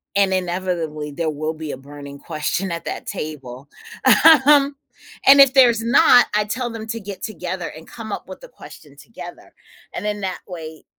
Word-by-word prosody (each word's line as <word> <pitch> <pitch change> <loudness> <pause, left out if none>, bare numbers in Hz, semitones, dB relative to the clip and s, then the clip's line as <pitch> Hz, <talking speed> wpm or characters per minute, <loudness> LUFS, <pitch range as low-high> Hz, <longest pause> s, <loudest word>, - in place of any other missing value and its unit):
and 195 -1 +2
inevitably, 175 -5 -3
there 160 +2 -3
will 155 +2 -4
be 155 -1 -7
a - - -6
burning 140 +1 -11
question 170 +5 -3
at 170 - -5
that - - -6
table. 135 -3 -7 0.8
Um, 285 -1 +4 0.5
and 280 +1 +8
if 275 -1 +6
there's 240 -4 +5
not, 245 0 +5
I 210 - +2
tell 240 +4 -3
them 225 -1 -7
to 230 +1 -4
get 195 -2 -9
together 180 -4 -5
and 160 +1 -13
come 220 -3 -9
up - - -6
with - - -10
the - - -12
question - - -15
together, - - -12 0.4
and - - -6
then, 210 0 -2
that 190 -1 -4
way, 160 -4 -9
185 Hz, 180 wpm, -20 LUFS, 155-225 Hz, 0.8 s, and